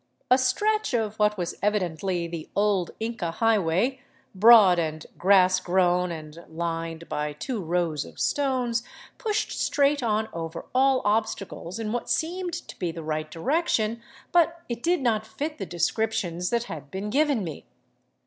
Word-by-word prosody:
A 255 - +8
stretch 420 - +1
of 220 -2 -1
what 210 0 +3
was 175 -2 -2
evidently 185 -3 0
the 165 -2 -7
old 200 -3 +2
Inca 225 -6 -3
highway, 220 +5 +1 0.3
broad 200 -3 +7
and 155 -2 -3
grass 185 0 +5
grown 180 -1 +2
and 160 0 -8
lined 165 0 -4
by 150 0 -2
two 215 - -4
rows 165 -3 0
of - - -13
stones, 255 -4 0 0.4
pushed 435 -4 -1
straight 285 0 +1
on 220 -2 0
over 165 0 -5
all 265 0 +3
obstacles 205 -4 -1
in 220 -2 -3
what 240 +1 -3
seemed 345 +7 -1
to - - -11
be 175 -3 -1
the 165 0 -7
right 155 0 -3
direction, 230 - 0 0.3
but 340 -1 +2
it 235 -1 -4
did 345 +2 +1
not 225 -4 +1
fit 300 +8 -5
the 195 - -4
descriptions 175 0 -1
that 235 -1 +1
had 150 - -8
been 200 +5 -4
given 285 -4 +2
me. 160 -4 -7
210 Hz, 155 wpm, -26 LUFS, 170-245 Hz, 0.4 s, A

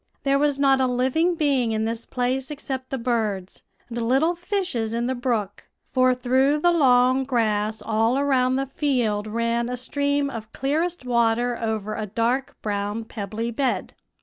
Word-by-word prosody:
"There 275 0 +2
was 290 -1 +2
not 270 -1 +4
a 260 - +3
living 260 +8 +1
being 275 -8 +1
in 220 0 0
this 225 +1 -4
place 255 +1 -1
except 265 -3 -5
the 270 - -2
birds, 220 -6 -2 0.3
and 235 0 -4
little 270 +9 +2
fishes 345 - -2
in 235 +1 -1
the 260 - 0
brook; 235 -6 -2 0.3
for 255 -1 +3
through 260 +3 +2
the 345 +3 +3
long 260 -4 +4
grass 220 -4 0
all 225 +3 +1
around 260 -2 +2
the 270 +1 0
field 245 -7 0
ran 230 +2 -1
a 250 - -3
stream 285 +2 -1
of 220 -2 -7
clearest 315 +3 -1
water 240 0 +2
over 220 -2 -3
a 215 -1 -4
dark 235 +5 -1
brown, 205 +1 -2
pebbly 220 +2 -4
bed. 255 +2 -1
250 Hz, 165 wpm, -24 LUFS, 225-275 Hz, 0.3 s, not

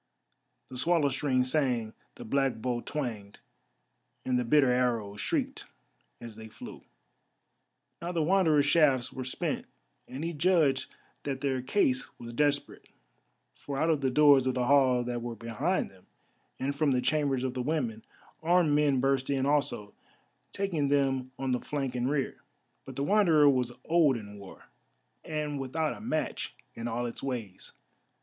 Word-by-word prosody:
The 130 -1 -7
swallow 160 -1 +3
string 130 -1 +1
sang, 125 -5 0 0.2
the 120 - -10
black 135 +1 +1
bow 120 +1 -2
twanged, 115 -10 -5 0.9
and 125 -1 +1
the - - 0
bitter 135 +1 +4
arrows 115 -5 0
shrieked - - -2 0.5
as 115 -2 -9
they 110 0 -10
flew. - - -10 1.2
Now 170 +1 -3
the 165 -3 0
Wanderer's 160 -4 +3
shafts 140 -6 +3
were 130 - -5
spent, 130 - -3 0.4
and 135 +4 -6
he 170 +1 -2
judged 155 -4 +2 0.3
that 135 -2 -4
their 130 -2 0
case 130 -2 +1
was 120 0 -9
desperate. 145 +2 0 0.6
For 140 -1 -6
out 160 +3 +2
of 150 -3 0
the 135 - +1
doors 140 -1 +5
of 130 - 0
the 125 -1 0
hall 130 -2 +4
that 120 -1 -3
were 120 0 -5
behind 115 - -2
them, 95 -1 -22 0.5
and 140 +2 -2
from 145 -2 +2
the 125 - +1
chambers 140 -3 0
of 130 -1 -2
the 130 - -3
women, 125 -6 -2 0.4
armed 170 -1 +3
men 145 -3 +3
burst 135 -1 +1
in 135 -1 +1
also, 140 -8 0 0.6
taking 175 -8 -1
them 135 -2 +1
on 135 -1 -2
the 125 - +1
flank 140 -3 -3
and 125 +1 -1
rear. 140 -2 -2 0.4
But - - -9
the 140 - -2
Wanderer 165 -5 +4
was 125 -3 +2
old 160 -6 +3
in 105 -2 -10
war, 100 -1 -13 0.6
and 150 -2 -3
without 150 +4 -1
a - - -11
match 155 -9 -3 0.2
in 115 - -5
all 120 +1 -2
its 120 - -6
ways. 115 -8 -5
135 Hz, 160 wpm, -29 LUFS, 125-150 Hz, 1.2 s, doors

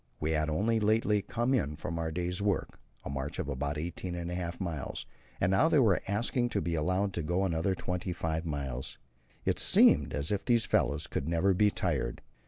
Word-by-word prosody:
We 75 +1 -1
had 75 0 +1
only 110 +8 +1
lately 105 -1 +2
come 120 +6 -1
in 75 - 0
from 85 +2 -4
our 80 -1 -1
day's 90 +3 -2
work 100 -2 -1 0.3
a - - -4
march 70 +1 -4
of - - -3
about 70 +2 -2
eighteen 85 +3 -4
and 85 0 -4
a - - -3
half 85 -1 -4
miles 85 -7 -4 0.3
and 90 - +2
now 145 +12 +4
they 155 - +4
were 110 -9 +4
asking 120 +4 0
to 105 - 0
be 85 -3 -2
allowed 90 +5 0
to 85 - -2
go 90 +5 0
on 95 -3 0
another 90 +4 0
twenty 90 0 -3
five 80 -1 -2
miles. 70 -6 -4 0.5
It - - +1
seemed 70 -1 +5
as 70 +4 -1
if 100 -1 0
these 120 -3 +2
fellows 75 +1 +1
could 70 - -3
never 85 +4 +3
be 105 +3 +4
tired. - - -2
85 Hz, 210 wpm, -30 LUFS, 75-100 Hz, 0.5 s, seemed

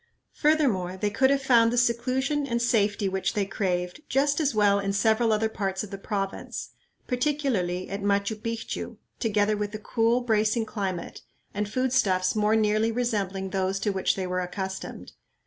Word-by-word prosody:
Furthermore, 240 - +1
they 205 +2 -1
could 265 +5 +3
have 275 0 +1
found 230 -3 +5
the 245 - -1
seclusion 255 +5 +1
and 235 -2 0
safety 210 -4 +1
which 190 0 -1
they 205 -2 +1
craved 180 +1 -2
just 285 +2 +2
as 290 -6 +1
well 205 -1 +4
in 195 0 -1
several 220 +2 +2
other 215 +1 +2
parts 195 -3 -3
of 210 - -9
the 195 - -5
province, 195 -1 -4 0.3
particularly 250 -10 -1
at 200 +1 -5
Machu 200 +1 +1
Picchu, 230 +1 -5 0.2
together 215 -2 +1
with 210 0 -3
a - - -2
cool, 230 +3 +1
bracing 220 -1 +1
climate 195 -5 -4 0.3
and 205 +1 -2
food 255 +3 0
stuffs 185 -6 +2
more 215 +1 +3
nearly 215 +1 +2
resembling 200 -5 -2
those 190 0 0
to 205 +1 0
which 190 -1 +1
they 190 - -3
were 180 0 -1
accustomed. 190 +1 -5
210 Hz, 170 wpm, -26 LUFS, 195-235 Hz, 0.3 s, found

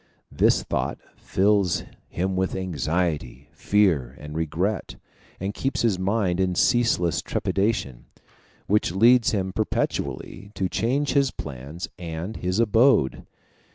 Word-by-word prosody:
This - - +3
thought - - -2 0.2
fills 100 -2 +1 0.3
him 95 +2 -2
with 95 0 -1
anxiety, 80 -5 -2
fear, 80 -12 +1
and 75 +1 -8
regret, 80 +6 -2 0.4
and 95 +2 -3
keeps 135 +4 -2
his 105 -6 +2
mind 95 -2 0
in 95 -1 +1
ceaseless 110 -7 +2
trepidation, 95 - -1 0.6
which 105 -3 +1
leads 115 +4 +5
him 95 -3 -1
perpetually 105 -1 -3
to 95 - 0
change 130 +9 0
his 140 -2 +3
plans 70 - -7
and 85 +4 -5
his 90 +3 -1
abode. 115 - +3
95 Hz, 120 wpm, -24 LUFS, 85-110 Hz, 0.6 s, leads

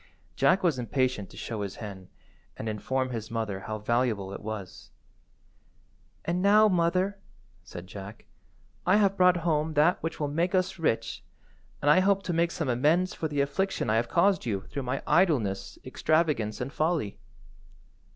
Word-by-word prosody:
Jack 190 +1 +3
was 160 -8 +2
impatient 125 -5 -1
to - - -14
show 110 -3 -4
his 100 -2 -4
hen, 95 -4 -9 0.5
and 110 - -5
inform 130 +4 -2
his 115 -2 -5
mother 110 -4 -3
how 110 +3 -5
valuable 110 -3 0
it - - -7
was. 105 -3 -7 1.4
"And 175 +2 0
now, 210 +2 +6
mother," 185 +2 +1 0.4
said 90 - -9
Jack, 100 +3 -10 0.6
"I 185 - +4
have 200 -2 +3
brought 180 -1 +5
home 155 -1 0
that 155 +5 +3
which 165 - -4
will 150 - 0
make 170 +6 0
us 185 0 0
rich, 150 -8 -1 0.6
and 145 - +5
I 150 - +6
hope 195 +1 +2
to 180 - -2
make 170 +1 +2
some 160 -3 -3
amends 155 +9 +2
for 160 - -3
the 145 -2 0
affliction 140 - -1
I 110 - +3
have 120 +1 0
caused 190 +2 +3
you 100 -5 -2
through 140 - -6
my 130 +1 -3
idleness, 135 - +1
extravagance, 155 -9 0
and 135 +3 -4
folly." 155 - -1
145 Hz, 165 wpm, -28 LUFS, 110-175 Hz, 1.4 s, now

